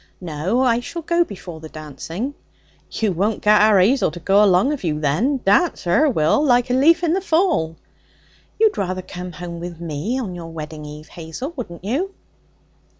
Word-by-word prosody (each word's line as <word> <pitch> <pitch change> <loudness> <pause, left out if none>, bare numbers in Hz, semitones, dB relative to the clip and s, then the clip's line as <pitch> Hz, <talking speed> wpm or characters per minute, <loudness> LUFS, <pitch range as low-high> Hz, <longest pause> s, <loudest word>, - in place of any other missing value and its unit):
'No. 180 - -1
I 240 -3 +3
shall 335 +7 -6
go 340 +2 +2
before 180 - -9
the 160 0 -10
dancing.' 160 - -6 0.6
'You 220 -3 -1
won't 200 +5 -1
get 210 0 +5
our 210 -1 +5
'Azel 245 +9 +3
to 170 +3 -9
go 195 +4 +4
along 200 +8 +4
of 285 - -6
you, 155 -3 -1
then. 220 - +1
Dance 330 - +3
her 280 - +3
will, 160 - +2
like 245 -3 +3
a - - +2
leaf 320 +7 +4
in 335 -1 +2
the 385 - 0
fall.' 320 - +1 0.8
'You'd 440 - +3
rather 185 -1 -2
come 180 0 -8
home 170 -1 -7
with 170 -1 -7
me 170 - -3
on 210 -8 -4
your 170 -2 -7
wedding 155 -1 -7
eve, 150 +1 -10
Hazel, 175 - -7
wouldn't 180 -10 -7
you?' 340 - -2
195 Hz, 185 wpm, -21 LUFS, 165-265 Hz, 0.8 s, get